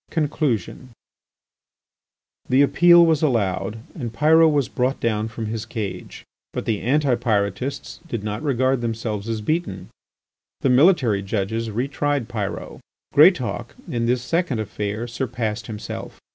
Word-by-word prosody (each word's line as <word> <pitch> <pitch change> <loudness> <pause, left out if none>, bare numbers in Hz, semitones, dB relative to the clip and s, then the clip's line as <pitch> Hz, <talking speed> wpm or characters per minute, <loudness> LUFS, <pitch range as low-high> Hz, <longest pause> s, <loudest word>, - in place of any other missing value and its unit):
XI. - - -19
CONCLUSION 140 - -1 1.6
The 130 +2 +5
appeal 170 +5 +6
was 160 -3 +2
allowed, 105 - 0
and 120 -8 -5
Pyrot 160 +7 +5
was 145 -4 +1
brought 130 +2 -1
down 110 -1 0
from 110 0 -6
his 110 0 -3
cage. 105 -4 -6 0.3
But - - -4
the 110 -3 -1
Anti 140 +1 +2
Pyrotists 115 +1 -2
did 115 -9 -4
not 105 +1 -3
regard 130 -3 +1
themselves 115 -2 -3
as 110 -1 -2
beaten. 155 - -2 0.7
The 135 - +2
military 125 - +4
judges 110 +3 -2
re 120 +5 -2
tried 145 -3 -1
Pyrot. 105 -3 -5 0.3
Greatauk, - - +3
in 115 -1 -1
this 125 0 +1
second 165 -3 0
affair, 105 +1 -3
surpassed 120 -3 -3
himself. 105 -3 -7
120 Hz, 135 wpm, -22 LUFS, 110-140 Hz, 1.6 s, appeal